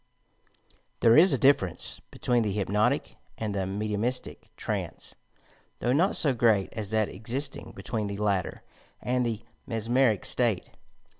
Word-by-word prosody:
There 115 0 +6
is 180 +7 +7
a - - +3
difference 100 - +1
between 120 -1 0
the 105 -2 0
hypnotic 105 +1 0 0.2
and 110 -2 -3
the 95 -2 -2
mediumistie 105 +5 -2 0.2
trance, - - -4 0.6
though 125 - 0
not 180 +8 +3
so 145 -5 +5
great 110 -5 +2
as 105 -3 -5
that 110 -1 +1
exist 125 +8 -3
ing - - -9
between 110 -3 -3
the 100 0 -5
latter 100 -3 -1 0.4
and 125 0 0
the 115 -2 -3 0.2
mesmeric 115 -1 +1
state. 115 -6 +1
110 Hz, 140 wpm, -27 LUFS, 105-125 Hz, 0.6 s, is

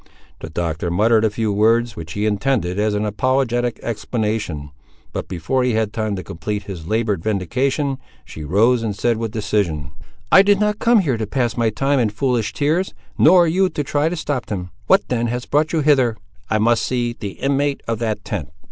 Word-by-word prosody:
The 80 - -7
Doctor 85 +1 -2
muttered 110 +5 +3
a 110 - +3
few 110 0 -1
words, 115 +2 +2
which 80 -1 -7
he 105 +1 -1
intended 105 -3 0
as 105 0 +1
an 105 +1 0
apologetic 120 +2 0
explanation, 105 - -3 0.4
but - - -4
before 95 +10 -1
he 125 -1 +1
had 110 -1 0
time 110 -2 -1
to 95 - -5
complete 100 +5 -4
his 85 -5 -8
laboured 110 -4 0
vindication, 130 - -1 0.3
she 80 - -9
arose 110 - +3
and 110 -3 -2
said 115 +2 +1
with 115 0 -2
decision— 90 -10 -1 0.4
"I 190 - +9
did 200 0 +3
not 210 0 +1
come 235 -2 +4
here 135 -9 0
to 110 -1 -3
pass 120 0 -1
my 115 -2 +2
time 135 +5 +1
in 115 -3 +2
foolish 115 -1 -1
tears, 160 +6 0 0.2
nor 175 +1 +6
you 185 +3 +2
to 150 -3 -3
try 145 +3 0
to 175 - -3
stop 145 -6 -3
them. 90 -4 -5 0.2
What 195 - +4
then 120 -1 0
has 120 +1 -3
brought 150 +2 +1
you 160 - +1
hither?" 130 -6 +3 0.3
"I 110 - +2
must 115 +1 +3
see 120 -1 -1
the 100 -4 -6
inmate 140 +1 -1
of 115 -1 -1
that 110 -2 -2
tent." - - -4
115 Hz, 200 wpm, -20 LUFS, 105-135 Hz, 0.4 s, I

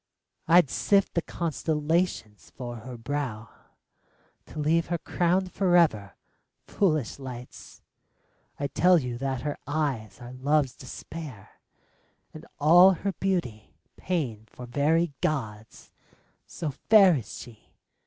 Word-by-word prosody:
I'd 170 -4 +5
sift 200 -1 +2
the 170 - +1
constellations 160 - -2
for 120 -2 -6
her 120 +2 -9
brow, 115 -3 -4 1.0
To - - -12
leave 160 +3 +1
her 170 - -1
crowned 180 +3 0
forever. 170 - +2 0.5
Foolish 155 - 0
lights, 125 -2 -10 0.8
I 140 - -1
tell 180 +5 +4
you 125 -5 -3
that 135 -2 -2
her 145 +1 -4
eyes 135 -9 -2
are 120 +1 -10
Love's 135 0 +1
despair, 140 -3 -9 0.8
And - - -11
all 175 +6 +7
her 195 +3 -3
beauty 170 - -2 0.2
pain 125 - -3
for 125 +3 -11
very 150 +5 +1
gods, 110 -8 -4 0.6
So 155 -3 -4
fair 195 +4 +5
is 120 - -7
she 115 -3 -13
145 Hz, 115 wpm, -27 LUFS, 120-170 Hz, 1.0 s, all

